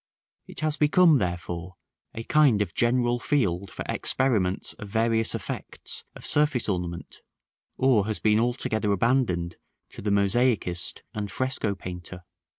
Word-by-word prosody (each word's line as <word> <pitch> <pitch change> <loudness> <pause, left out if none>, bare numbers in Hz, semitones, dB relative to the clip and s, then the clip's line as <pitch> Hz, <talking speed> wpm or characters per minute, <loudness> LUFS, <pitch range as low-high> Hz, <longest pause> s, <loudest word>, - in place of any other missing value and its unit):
It - - -7
has 155 -1 0
become, 155 0 +5
therefore, 90 0 -4 0.4
a 115 - -5
kind 135 -7 +4
of 85 -5 -9
general 120 0 +2
field 100 -10 0
for - - -7
experiments 105 -9 0
of 105 - -8
various 115 +1 +1
effects - - -5
of - - -10
surface 145 -5 +2
ornament, 90 -3 -4 0.6
or 120 -6 +3
has 110 - -2
been 110 0 +3
altogether 115 -3 0
abandoned 95 -6 +1 0.3
to - - -9
the 105 - -1
mosaicist 100 -3 +1
and 105 -1 -4
fresco 130 -5 -1
painter. 90 -1 -8
110 Hz, 135 wpm, -26 LUFS, 90-125 Hz, 0.6 s, become